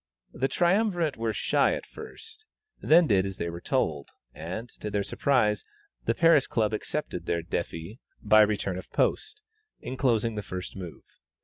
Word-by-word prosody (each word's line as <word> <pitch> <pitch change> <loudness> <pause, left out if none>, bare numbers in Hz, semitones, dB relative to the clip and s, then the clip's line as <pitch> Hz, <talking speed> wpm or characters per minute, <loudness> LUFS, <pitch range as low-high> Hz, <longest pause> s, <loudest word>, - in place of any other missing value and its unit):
The 135 - 0
triumvirate 175 -1 +1
were 115 0 -1
shy - - +2
at - - -7
first, 445 -1 -11 0.4
then 165 +3 +6
did 100 -8 +3
as 95 -1 -5
they 85 - -3
were 85 +1 -8
told, 80 - -1 0.2
and, 90 +9 -6
to 105 - -4
their 100 -1 0
surprise, 105 -5 +1 0.4
the - - +1
Paris 165 -3 +5
Club 110 -1 0
accepted 105 - -4
their 85 -1 0
défi 85 +5 -5 0.2
by 110 0 +5
return 100 -3 +1
of - - -12
post, 430 0 -1 0.4
enclosing 120 -4 0
the 105 - -3
first 90 -2 -7
move. 90 -4 -8
110 Hz, 155 wpm, -27 LUFS, 95-140 Hz, 0.4 s, then